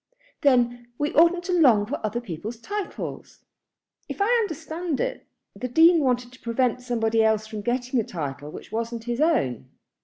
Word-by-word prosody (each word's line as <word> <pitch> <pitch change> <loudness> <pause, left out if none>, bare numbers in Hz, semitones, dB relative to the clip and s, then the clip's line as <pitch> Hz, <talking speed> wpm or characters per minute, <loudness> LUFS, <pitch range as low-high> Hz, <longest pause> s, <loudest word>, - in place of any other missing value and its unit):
"Then 245 -4 +2
we 295 +1 -1
oughtn't 340 +2 +4
to 360 - -2
long 250 -12 +5
for 250 +4 -5
other 215 +2 -1
people's 220 +1 -6
titles." 410 - -6 0.7
"If - - -6
I 400 - +3
understand 325 - -3
it, - - -3 0.3
the 235 +6 -4
Dean 325 +7 +6
wanted 250 -3 0
to 255 - -17
prevent 245 +1 0
somebody 225 -2 +1
else 220 -1 +2
from 215 -1 -6
getting 245 +2 -1
a - - +1
title 145 -6 -5
which - - -10
wasn't 230 +1 -3
his 240 +3 -2
own. 305 - +1
245 Hz, 165 wpm, -25 LUFS, 225-315 Hz, 0.7 s, Dean